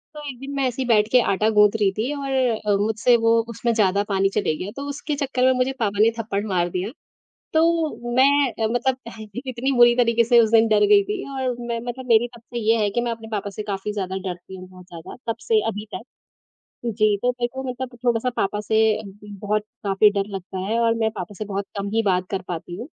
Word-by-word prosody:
तो 300 - -7
एक 250 - -9
दिन 270 +1 -7
मैं 270 -2 +1
ऐसे 250 +2 -3
ही 250 - -2
बैठ 210 -2 +4
के 250 - +6
आटा 215 +3 +1
गूँथ 210 0 +7
रही 195 - +4
थी 240 +7 -1
और 275 -1 -4
अ, 230 -6 +1
मुझसे 220 +3 +3
वो 230 0 +4
उसमें 235 +1 -1
ज़्यादा 200 -2 +2
पानी 195 0 +2
चले 180 -7 +1
गया, 185 +5 -5
तो 280 - -5
उसके 290 +1 -4
चक्कर 270 -3 -1
में 260 - +5
मुझे 255 +1 0
पापा 205 -2 -1
ने 225 +2 +5
थप्पड़ 205 -2 -2
मार 175 -3 0
दिया। 185 +5 -3 0.6
तो 320 -7 +1
मैं 275 0 +4
अ, - - +2
मतलब 250 +2 0
अह, 225 -1 -9 0.2
इतनी 255 +1 -2
बुरी 240 0 +7
तरीके 235 -1 +3
से 240 +1 +5
उस 220 - +2
दिन 225 0 +5
डर 215 - +4
गई 410 -1 +6
थी 405 -1 -4
और 260 -2 -2
मैं 235 -1 -3
मतलब 255 +1 -5
मेरी 230 +1 +5
तब 235 - -15
से 240 +1 -6
ये 225 +1 +2
है 205 - +1
कि 240 +4 -1
मैं 240 -1 -1
अपने 225 -1 -7
पापा 205 -1 -3
से 210 +2 -6
काफ़ी 200 0 -4
ज़्यादा 190 -2 -3
डरती 180 +2 -8
हूँ 185 0 -10
बहुत 185 -1 -14
ज़्यादा, 170 -2 -10 0.2
तब - - -4
से 440 -2 +4
अभी 210 -1 -4
तक - - -6 0.8
जी। 215 -2 +2
तो 250 - +3
मेरे 245 -1 -2
को 265 - -4
मतलब 250 0 -6
थोड़ा-सा 240 +1 +1
पापा 205 +1 -1
से 215 +1 -1 0.2
अभी 205 -2 -9 0.2
भी - - -9
बहुत 210 +1 0 0.2
काफ़ी 200 +1 +4
डर 200 -1 -1
लगता 190 0 -6
है 225 +3 0
और 230 -1 +3
मैं 225 -1 0
पापा 205 -2 -7
से 215 - -3
बहुत 200 -1 -3
कम 200 0 -3
ही 225 - +3
बात 185 -1 +1
कर 190 -2 -2
पाती 175 0 -5
हूँ। 225 - -6
225 Hz, 245 wpm, -22 LUFS, 205-250 Hz, 0.8 s, गूँथ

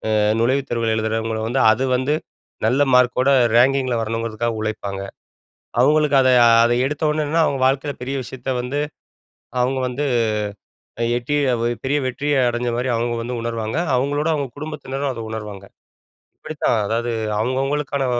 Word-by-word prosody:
அ - - +3 0.2
நுழைவுத் 135 +3 +1
தேர்வு 115 -1 0
எழுதுறவங்கள 110 0 -2
வந்து, 130 +3 +1
அது 130 +5 0
வந்து 130 +4 +1 0.5
நல்ல 130 +5 +2
மார்க்கோட 125 +1 +3 0.3
ரேங்கிங்கில 130 -1 +3
வரணுங்கிறதுக்காக, 115 +1 -2
உழைப்பாங்க. 100 -3 -4 0.8
அவுங்களுக்கு 150 0 +4
அத, 130 - +3 0.4
அத 120 - +1
எடுத்த 150 +3 -3
உடனே 155 0 0
என்னன்னா, 160 +3 +2
அவுங்க 135 -3 -1
வாழ்க்கையில 135 +1 -1
பெரிய 135 +2 -3
விஷயத்த 130 +1 -7
வந்து 135 +4 -3 0.8
அவுங்க 130 +2 +1
வந்து 135 +4 -3 1.0
அ - - +2
எட்டி 135 +5 -2 0.5
பெரிய 145 +2 +1
வெற்றிய 140 +3 -1
அடஞ்சமாரி 120 +1 -2
அவுங்க 120 +1 -1
வந்து 120 +2 -4
உணர்வாங்க. 115 0 -3 0.2
அவுங்களோட 145 +4 0
அவுங்க 140 -4 -2
குடும்பத்தினரும் 145 -2 -4
அத 115 - -6
உணர்வாங்க. 105 -3 -7 0.7
இப்பிடித்தான், 150 -6 -1
அதாவது 115 +2 -1 0.3
அவுங்கவங்களுக்கான 135 +3 -1
130 Hz, 135 wpm, -21 LUFS, 115-140 Hz, 1.0 s, அவுங்களுக்கு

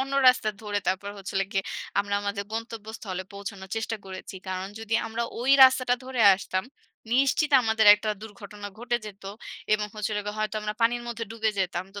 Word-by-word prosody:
অন্য 270 +1 -3 0.2
রাস্তা 250 -3 +3
ধরে 205 -1 -1
তারপর 200 +2 -1
হচ্ছিলগে 195 0 -2 0.4
আমরা 200 0 -2
আমাদের 200 0 -3
গন্তব্যস্থলে 220 -4 -5
পৌঁছানোর 200 -1 -8
চেষ্টা 225 0 -2
করেছি। 190 0 -8
কারণ 185 0 -3
যদি 225 0 -2
আমরা 225 +1 -3 0.2
ওই 255 +3 +1
রাস্তাটা 255 -1 +4
ধরে 260 -2 -3
আসতাম, 185 0 -3 0.5
নিশ্চিত 275 +4 +3
আমাদের 220 -1 +2
একটা 215 +1 -5
দুর্ঘটনা 205 -1 -9
ঘটে 240 0 0
যেত 200 -2 -11 0.5
এবং 210 0 +2
হচ্ছিলগে 215 0 -2 0.3
হয়তো 215 0 -1
আমরা 210 0 -3
পানির 240 +1 +2
মধ্যে 230 -1 -4
ডুবে 220 -1 0
যেতাম। 180 -1 -1
তো 200 - -6
215 Hz, 165 wpm, -27 LUFS, 200-230 Hz, 0.5 s, রাস্তাটা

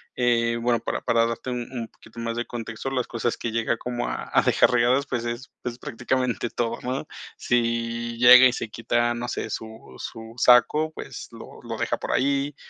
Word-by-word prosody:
eh, 115 -1 +2
bueno, 120 -1 +2
para - - -3
para 115 0 +2
darte 115 +2 -4
un 120 -1 -3
un 115 -3 -4
poquito 115 +1 -15
más 115 0 -3
de 120 - -1
contexto, 115 +2 -5
las 130 -2 -1
cosas 120 0 -1
que 115 - -3
llega 115 0 0
como 120 0 -3
a - - -5
a - - +6
dejar - - +4
regadas, 125 +3 +3
pues 120 -2 -2
es 120 +2 -5
es 120 0 -4
prácticamente 125 -2 -1
todo, 115 -1 -2
¿no?, 130 +4 -3 0.3
si 115 -1 -1
llega 125 +1 +9
y 125 - 0
se 115 - -4
quita, 120 +1 0
no 120 +1 -4
sé, - - -3
su 110 - -8
su 115 0 -8
saco, 150 +7 +5
pues - - -8
lo - - -12
lo - - -5
deja - - -1
por - - -5
ahí, 140 +1 +1
120 Hz, 200 wpm, -25 LUFS, 115-125 Hz, 0.3 s, llega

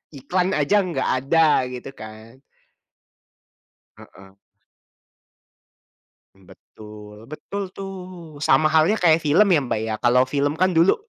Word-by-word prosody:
iklan 180 +7 -2
aja 200 +8 +2
enggak 170 -7 -3
ada 155 -2 +3
gitu 125 +2 -8
kan. 110 +3 -13 1.6
Heeh. 95 0 -17 2.0
Betul 105 +3 -15
betul 195 +7 -7
tuh, 180 -5 -10
sama 155 +1 +2
halnya 160 +6 +3
kayak 165 -6 +3
film 160 +7 +2
ya 165 - +4
Mbak 110 - -2
ya 110 -1 -3
kalau 125 +1 +3
film 145 +2 -1
kan 185 +3 +1
dulu, 170 +2 +3
150 Hz, 115 wpm, -21 LUFS, 120-175 Hz, 2.0 s, ya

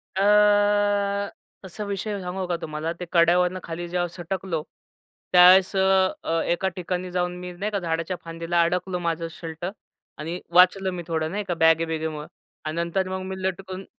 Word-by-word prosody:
अ, 205 0 +3 0.3
कसा 190 +3 -7
विषय 200 +1 -3
आहे 200 - -4
सांगू 180 +1 -4
का 175 - 0
तुम्हाला. 155 +1 -3
ते 180 +1 -7
कड्यावरून 180 +2 +3
खाली 170 +1 -5
जेव्हा 175 0 0
सटकलो, 175 -1 -4 0.7
त्यावेळेस 180 +2 +7
अ, 190 0 +4
अ, 165 0 0
एका 190 +2 -1
ठिकाणी 180 0 -3
जाऊन 180 0 -1
मी 180 0 -6
नाही 200 +4 -4
का 200 - -1
झाडाच्या 165 +1 -2
फांदीला 165 +1 -1
अडकलो 180 +1 -1
माझं 165 -1 -2
शर्ट 165 0 -7 0.5
आणि 165 +4 -5
वाचलं 185 +1 +5
मी 175 -1 -5
थोडं 160 -1 -1
नाही 205 +1 -2
का, 180 -2 -2
बॅगे-बिगेमुळं 160 -2 +1 0.4
अन् 155 - -3
नंतर 170 +3 -1
मग 190 0 -3
मी 190 - -6
लटकून 190 0 -4
180 Hz, 165 wpm, -24 LUFS, 165-190 Hz, 0.7 s, त्यावेळेस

